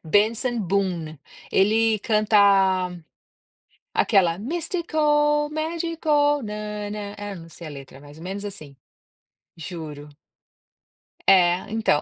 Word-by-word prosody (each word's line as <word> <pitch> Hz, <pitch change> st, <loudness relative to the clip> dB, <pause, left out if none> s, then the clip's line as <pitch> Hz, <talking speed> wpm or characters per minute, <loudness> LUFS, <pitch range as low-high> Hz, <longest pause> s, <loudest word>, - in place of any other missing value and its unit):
Benson 220 Hz, +7 st, +2 dB
Boone, 175 Hz, -5 st, -1 dB, 0.3 s
ele 220 Hz, +2 st, +3 dB
canta 215 Hz, 0 st, +2 dB, 1.6 s
aquela 190 Hz, -6 st, +3 dB
é: -, -, -12 dB
"mystical, 295 Hz, -, +1 dB
magical 310 Hz, -2 st, 0 dB
na-na-na" 210 Hz, -1 st, -5 dB
não 165 Hz, -1 st, -11 dB
sei 165 Hz, 0 st, -10 dB
a -, -, -7 dB
letra, 135 Hz, -2 st, -11 dB
mais 145 Hz, +1 st, -14 dB
ou 165 Hz, -, -11 dB
menos 195 Hz, +3 st, -5 dB
assim, 155 Hz, -9 st, -8 dB, 0.8 s
juro, 155 Hz, -4 st, -8 dB, 1.2 s
é 180 Hz, -2 st, +6 dB
então, 220 Hz, -9 st, +2 dB
205 Hz, 100 wpm, -23 LUFS, 175-290 Hz, 1.6 s, é